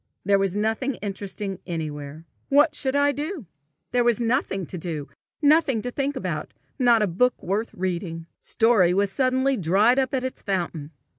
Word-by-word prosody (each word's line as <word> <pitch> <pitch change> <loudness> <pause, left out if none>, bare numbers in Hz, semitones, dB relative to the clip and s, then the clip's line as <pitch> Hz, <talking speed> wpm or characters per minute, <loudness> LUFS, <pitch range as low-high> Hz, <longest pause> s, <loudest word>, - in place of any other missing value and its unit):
There 200 0 +4
was 195 -1 0
nothing 225 +5 0
interesting 200 -1 -5
anywhere. 155 -2 -5 0.2
What 295 +2 +5
should 270 -2 -1
I 285 0 +4
do? 295 - -5 0.5
There 245 -1 +2
was 240 -1 +2
nothing 230 -6 0
to 180 - -7
do, 155 -4 -4 0.4
nothing 285 -7 +4
to 245 - -3
think 280 +2 -2
about, - - -4 0.2
not 240 -3 +5
a - - +2
book 250 +9 +1
worth 205 +5 -1
reading. 175 -2 -3
Story 215 -7 +3
was 200 0 +1
suddenly 260 +2 +1
dried 205 +8 +3
up 270 +1 0
at 255 - -1
its 260 - -4
fountain. 170 -6 -3
215 Hz, 165 wpm, -24 LUFS, 185-260 Hz, 0.5 s, What